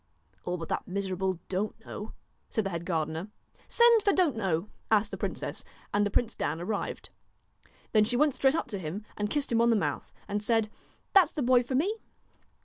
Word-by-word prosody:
'All 180 0 -1
but 165 -1 -6
that - - -2
miserable 190 -1 -1
Don't 200 +4 -2
know,' 210 - -7 0.4
said 220 - 0
the 195 - -1
head 170 0 -4
gardener. 160 +1 -1 0.4
'Send 470 -1 +6
for 405 - +3
Don't 350 -10 +3
know,' 190 -4 0 0.2
asked 210 -1 +3
the - - -3
princess, - - -4 0.3
and 205 0 +3
the 205 - +1
prince 230 +3 +1
Dan 155 +3 -2
arrived. 200 +4 -3 0.8
Then 215 -1 +5
she 240 +3 0
went 295 +1 +4
straight 270 +3 +3
up - - 0
to 200 - -3
him 185 +5 -5
and 210 0 -2
kissed 285 0 -1
him 230 0 +3
on 235 - +4
the 230 - +5
mouth, 205 - -2 0.2
and 205 0 -1
said: 220 0 +1 0.2
' - - -37
That 385 -3 +7
's - - -17
the 295 - -1
boy 250 0 +5
for 250 +2 -3
me.' 385 +11 +1
210 Hz, 210 wpm, -29 LUFS, 190-250 Hz, 0.8 s, That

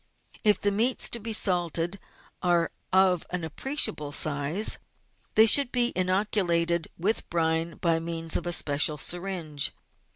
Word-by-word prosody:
If 210 -2 +4
the 205 - 0
meats 230 +6 +2
to 235 - -3
be 225 +1 -5
salted 175 -2 -1 0.4
are 175 -2 +1 0.2
of 190 -2 +3
an 180 -1 -4
appreciable 160 - 0
size, 150 +7 0 0.6
they 220 - +7
should 260 +3 +5
be 245 -1 +4
inoculated 180 -3 0
with 200 +6 -1
brine 165 0 -1
by 165 -2 0
means 165 0 -3
of - - -2
a - - -1
special 150 -1 +1
syringe. 175 -3 -2
175 Hz, 135 wpm, -26 LUFS, 165-205 Hz, 0.6 s, they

